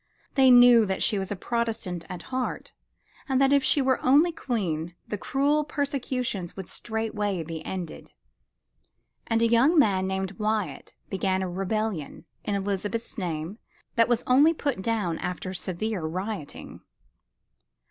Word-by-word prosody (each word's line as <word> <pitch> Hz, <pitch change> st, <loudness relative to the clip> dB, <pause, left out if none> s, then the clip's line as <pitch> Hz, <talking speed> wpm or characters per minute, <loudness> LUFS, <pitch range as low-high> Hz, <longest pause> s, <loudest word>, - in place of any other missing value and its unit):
They 265 Hz, -2 st, +5 dB
knew 245 Hz, -3 st, +8 dB
that 190 Hz, 0 st, -1 dB
she 210 Hz, -4 st, +2 dB
was 190 Hz, +1 st, -4 dB
Protestant 225 Hz, -8 st, -2 dB
at 175 Hz, -1 st, -7 dB
heart, 255 Hz, -1 st, -3 dB, 0.6 s
and 265 Hz, -1 st, +2 dB
that 275 Hz, 0 st, +4 dB
if 280 Hz, -1 st, +4 dB
she 285 Hz, -, +3 dB
were 260 Hz, -1 st, +1 dB
only 295 Hz, +7 st, +5 dB
Queen 175 Hz, -, -3 dB
the -, -, -3 dB
cruel 285 Hz, +8 st, +1 dB
persecutions 260 Hz, -, -3 dB
would 190 Hz, -3 st, -6 dB
straightway 210 Hz, -5 st, -3 dB
be 160 Hz, 0 st, -6 dB
ended. 180 Hz, -2 st, -6 dB, 1.2 s
And 225 Hz, 0 st, +2 dB
a -, -, +5 dB
young 250 Hz, +9 st, +4 dB
man 195 Hz, -9 st, +3 dB
named 190 Hz, 0 st, -3 dB
Wyatt 210 Hz, -9 st, -2 dB, 0.2 s
began 190 Hz, -1 st, 0 dB
a -, -, -2 dB
rebellion 195 Hz, -2 st, -3 dB, 0.2 s
in 205 Hz, -, -1 dB
Elizabeth's 205 Hz, +4 st, -3 dB
name 175 Hz, 0 st, -4 dB, 0.3 s
that 230 Hz, 0 st, +3 dB
was 240 Hz, -1 st, +1 dB
only 290 Hz, +6 st, +5 dB
put 280 Hz, -10 st, -2 dB
down 195 Hz, -6 st, -1 dB
after 180 Hz, +1 st, -4 dB
severe 190 Hz, +2 st, -3 dB
rioting. 185 Hz, +1 st, -5 dB
215 Hz, 140 wpm, -26 LUFS, 185-250 Hz, 1.2 s, knew